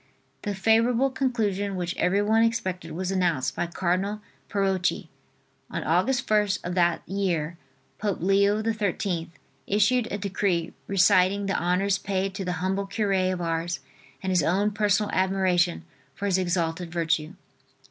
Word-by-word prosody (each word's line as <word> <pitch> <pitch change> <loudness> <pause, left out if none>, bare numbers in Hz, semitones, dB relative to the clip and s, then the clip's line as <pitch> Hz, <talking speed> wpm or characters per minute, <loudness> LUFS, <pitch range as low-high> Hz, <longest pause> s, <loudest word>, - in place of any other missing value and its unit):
The 205 -2 -3
favorable 230 +6 +3
conclusion 210 -7 -1
which 180 0 -3
everyone 205 +4 +2
expected 185 -8 -1
was 185 +3 -3
announced 170 -9 0
by - - -1
Cardinal 185 +4 -1 0.3
Parocchi. 195 -2 0 0.6
On - - -4
Aug. - - +2
1st, 210 -6 +1
of 175 - -2
that 175 -2 +1
year, 175 -5 -1 0.4
Pope 205 -2 -1
Leo 200 +4 +3
XIII, 200 -6 -1 0.4
issued 220 +4 +2
a 205 - -2
decree 190 -4 -1
reciting 195 +1 +3
the 195 - -1
honors 185 +3 +1
paid 195 0 -2
to 200 0 -4
the 180 -1 -2
humble 195 +1 -1
cure 205 0 -1 0.2
of 180 -1 -3
Ars 165 +1 -2 0.4
and 190 - -1
his 180 -2 +3
own 195 +7 +1
personal 210 0 +1
admiration 185 -2 +1 0.3
for 200 - -4
his 190 -2 +2
exalted 175 -1 -1
virtue. 165 -1 0
190 Hz, 140 wpm, -26 LUFS, 175-205 Hz, 0.6 s, favorable